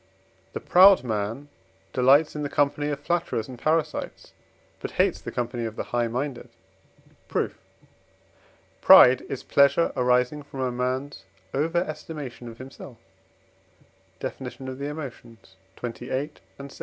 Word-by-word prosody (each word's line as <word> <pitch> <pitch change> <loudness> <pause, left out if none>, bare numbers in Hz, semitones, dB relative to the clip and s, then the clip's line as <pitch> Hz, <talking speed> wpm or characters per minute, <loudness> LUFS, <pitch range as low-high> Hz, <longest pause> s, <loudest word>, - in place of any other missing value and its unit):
The - - -3
proud 190 -1 +6
man 110 +4 -3 0.5
delights 140 +5 +4
in 150 - -3
the 145 - -3
company 145 +1 0
of 145 -1 -3
flatterers 170 -8 -1
and 130 - -9
parasites, 155 0 -2 0.5
but - - -5
hates - - +2
the - - -6
company 120 0 -3
of 110 -1 -5
the - - -3
high 120 -1 +1
minded. 125 +2 -4 0.8
Proof. - - -2 1.2
Pride 125 0 +8
is 135 - -5
pleasure 140 +4 +3
arising 125 +3 +1
from 140 -2 -8
a 130 -1 0
man's 125 -3 -3 0.3
over 160 +5 0
estimation 155 -6 -5
of 115 -1 -10
himself 130 -1 -11 1.2
(Def. 130 - -5
of 130 +1 -7
the 140 - -3
Emotions, 120 -9 -9 0.2
xxviii. 125 +4 -4 0.3
and 140 0 -9
vi.) - - -14
130 Hz, 135 wpm, -25 LUFS, 125-145 Hz, 1.2 s, Pride